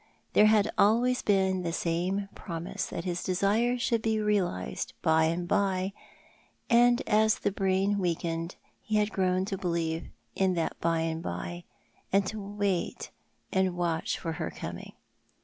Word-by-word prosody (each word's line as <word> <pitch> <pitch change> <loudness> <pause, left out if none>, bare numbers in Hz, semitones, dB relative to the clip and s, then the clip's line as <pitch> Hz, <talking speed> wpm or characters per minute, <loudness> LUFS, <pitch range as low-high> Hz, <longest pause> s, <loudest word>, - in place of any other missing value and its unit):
There 210 - +6
had 215 -1 +4
always 240 +4 +4
been 190 -2 +2
the 170 -1 -2
same 180 +4 -1
promise 170 -2 -5
tliat 170 - -4
his 175 -1 -3
desire 210 +7 +1
should 235 -2 0
be 220 0 +1
realised 185 - -1
hy 160 0 +4
and 170 +2 -1
by 195 -1 +1 0.4
— - - -31 0.3
and 240 +1 +5
as 220 0 +4
the - - -1
braiu 195 +1 +1
weakened 170 -1 -2 0.3
he 215 - -2
had 210 0 +2
grown 185 0 +1
to 195 -1 -4
believe 165 -2 -2 0.3
in 190 -1 +2
that 165 -1 -2
by 165 -1 +1
and 165 0 -2
by, 175 +1 -5 0.5
and 195 0 +3
to 215 +2 -4
wait 200 -2 -2 0.4
and 190 -2 +1
watch 170 -2 -1
for 165 - -4
her 160 - -3
coming. - - -7
190 Hz, 155 wpm, -29 LUFS, 170-210 Hz, 0.5 s, There